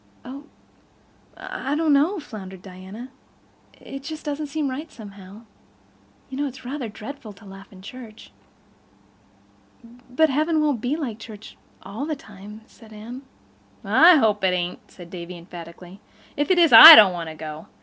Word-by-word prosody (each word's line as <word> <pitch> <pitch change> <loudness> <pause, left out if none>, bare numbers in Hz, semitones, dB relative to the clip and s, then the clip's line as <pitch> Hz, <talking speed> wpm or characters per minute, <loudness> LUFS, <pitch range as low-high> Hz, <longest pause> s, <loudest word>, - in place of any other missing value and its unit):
"Oh—I—I 275 0 -11
don't 310 -1 +1
know" 320 +8 +1
floundered 190 - -11
Diana. 190 +6 -11 0.7
"It 275 - -10 0.2
doesn't 295 0 -5
seem 295 0 -4
just 260 - -4
right, 305 +4 -9
somehow. 200 -1 -13 0.9
You 265 0 -8
know 290 - -1
it's 265 -1 -12
rather 260 -2 -6
dreadful 220 +1 -11
to 200 +2 -19
laugh 195 +1 -14
in 190 -1 -16
church." 225 -1 -13 1.8
"But 310 +4 +1
heaven 310 +3 0
won't 290 -7 -1
be 250 +5 -2
like 250 -9 -6
church—all 215 +2 -11
the 310 - -3
time," 210 -3 -14
said 225 -1 -20
Anne. 225 +5 -10 0.6
"I 310 - +5
hope 215 -8 +1
it 185 -1 +1
ain't," 175 0 -6
said 175 -2 -15
Davy 175 0 -9
emphatically. 175 +2 -13 0.3
"If 290 +4 -2
it 370 - +2
is 335 -3 +3
I 320 +1 +13
don't 200 -7 +6
want 170 -2 -6
to 160 - -10
go. 155 0 -10
225 Hz, 150 wpm, -22 LUFS, 190-285 Hz, 1.8 s, I